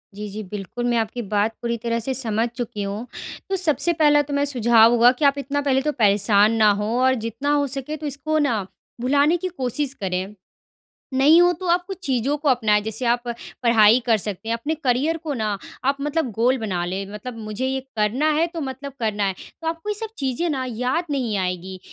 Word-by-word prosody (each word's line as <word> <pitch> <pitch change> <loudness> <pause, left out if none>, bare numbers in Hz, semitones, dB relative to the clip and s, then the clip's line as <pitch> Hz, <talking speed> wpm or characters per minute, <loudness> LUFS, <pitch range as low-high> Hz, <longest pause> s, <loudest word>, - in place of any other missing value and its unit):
जी, 210 +1 -6
जी, 210 +2 -6
बिल्कुल, 205 +4 -6
मैं 240 -1 +1
आपकी 225 +2 -2
बात 210 +2 +1
पूरी 235 0 -1
तरह 230 0 0
से 265 +4 -2
समझ 230 -3 0
चुकी 225 -5 -4
हूँ। 205 +4 -5 0.4
तो 390 - +1
सबसे 345 -1 +2
पहला 295 -1 +6
तो 290 0 -6
मेरा 285 0 +1
सुझाव 235 -4 +5
होगा 240 +1 +6
कि 295 - +2
आप 280 0 +4
इतना 280 +1 -2
पहले 270 -2 +2
तो 300 +2 0
परेशान 205 0 +4
ना 215 - +7
हों 210 - -2
और 260 0 +4
जितना 235 +6 -2
हो 285 -1 +2
सके 275 +3 -4
तो 310 - -8
इसको 300 +3 -2
ना, 240 -8 +1 0.4
भुलाने 285 +6 +3
की 370 - -3
कोशिश 275 -4 -2
करें। 190 +1 -3 0.8
नहीं 290 +6 +6
हो 355 0 +5
तो 370 - -4
आप 355 0 +1
कुछ 385 -2 -6
चीज़ों 265 +2 0
को 295 0 -1
अपनाएँ 220 -5 +3
जैसे 220 +3 -3
आप 240 +1 +2 0.4
पढ़ाई 230 0 +5
कर 230 -2 +4
सकते 210 +2 -5
हैं, 230 - +1
अपने 290 +7 -2
करियर 290 +2 0
को 310 -3 -4
ना 215 -4 -2 0.3
आप 275 +1 +2
मतलब 295 -1 -1
गोल 245 +5 +2
बना 190 -6 -2
लें 190 +3 -3
मतलब 235 +3 -7
मुझे 215 +4 -3
ये 265 0 -1 0.2
करना 230 +9 +1
है 315 +3 +2
तो 340 -1 -7
मतलब 275 0 -6
करना 210 -2 0
है, 195 -1 0 0.3
तो 325 - -2
आपको 330 +5 -5
ये - - 0
सब 445 0 -6
चीज़ें 270 +5 -1
ना 265 -3 -2
याद 250 +8 -1
नहीं 250 -7 -1
आएगी 185 0 -3
250 Hz, 215 wpm, -22 LUFS, 215-285 Hz, 0.8 s, ना